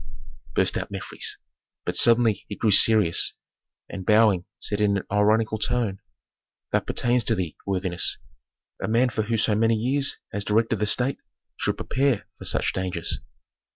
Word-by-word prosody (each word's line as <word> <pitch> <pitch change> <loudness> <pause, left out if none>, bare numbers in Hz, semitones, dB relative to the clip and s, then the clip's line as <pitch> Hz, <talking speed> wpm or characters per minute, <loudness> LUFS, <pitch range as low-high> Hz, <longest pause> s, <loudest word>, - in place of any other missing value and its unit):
burst - - +1
out - - -6
Mefres, - - -4 0.5
but - - -3
suddenly 115 -2 +4
he 105 - -5
grew 110 0 0
serious 105 -4 +5 0.5
and 95 - -8
bowing 105 -3 +3
said 105 0 -2
in 100 -1 +2
an 95 - -4
ironical 110 +1 +1
tone, 110 -3 0 0.7
"That - - -1
pertains 120 0 0
to 115 - +1
thee, 90 -5 -4
worthiness. 95 -2 +1 0.6
A - - -3
man 120 +3 +2
who 110 - -2
for 115 +2 -2
so 110 0 +2
many 115 +2 +2
years 135 +5 0 0.2
has 100 +1 -2
directed 110 +2 0
the 105 - 0
state 125 +5 +1 0.4
should - - -2
prepare 130 -5 -1
for - - -12
such - - +1
dangers." 90 -3 -2
110 Hz, 155 wpm, -24 LUFS, 100-115 Hz, 0.7 s, serious